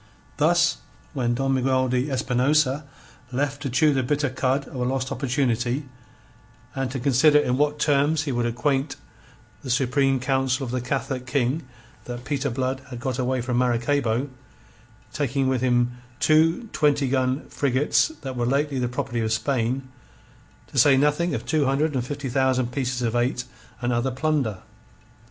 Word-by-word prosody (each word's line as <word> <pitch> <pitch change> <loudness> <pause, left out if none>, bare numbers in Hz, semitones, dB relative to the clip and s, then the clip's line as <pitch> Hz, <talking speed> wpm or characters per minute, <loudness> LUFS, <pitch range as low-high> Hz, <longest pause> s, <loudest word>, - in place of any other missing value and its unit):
Thus - - +3 0.4
was 125 -3 -1
Don 135 +1 0
Miguel 130 0 +2
de 125 +3 0
Espinosa 135 +2 +1 0.5
left 140 +2 -2
to 140 - -3
chew 145 +4 +3
the 135 - +1
bitter 145 +1 0
cud 130 +1 0
of - - -13
a 125 - -1
lost 130 +1 -1
opportunity, 130 0 -1 0.9
and 135 -1 -2
to 130 +1 -4
consider 140 +3 +4
in 125 -4 +2
what 150 +2 +1
terms 150 +1 +2
he 145 - -2
would 120 -1 0
acquaint 135 +4 -1 0.7
the 130 - -8
Supreme 135 +1 +2
Council 130 +1 0
of 120 - -5
the 125 0 -1
Catholic 130 0 -3
King 130 +3 0 0.4
that 120 0 -7
Peter 140 0 -1
Blood 130 +1 -2
had 125 -2 -7
got 130 0 -3
away 130 0 0
from 120 0 -1
Maracaybo, 125 +1 +1 0.8
taking 135 -2 0
with 130 -2 0
him 120 -1 +1 0.2
two 165 +8 +3
twenty 145 -2 +2
gun 130 +1 0
frigates 140 +1 +2 0.2
that 130 -1 -5
were 120 -1 -1
lately 140 +1 0
the 125 - 0
property 125 -1 -3
of 110 -1 -1
Spain, 130 +2 -1 0.8
to 135 - -2
say 135 +2 +6
nothing 150 +3 +2
of - - -5
two 155 -3 +1
hundred 145 +3 +1
and 130 -3 -1
fifty 140 +2 -5
thousand 130 -1 +1
pieces 125 -1 -2
of 115 0 -1
eight 125 +1 0 0.4
and 120 0 0
other 120 +3 0
plunder. 130 -6 -1
130 Hz, 165 wpm, -24 LUFS, 125-140 Hz, 0.9 s, say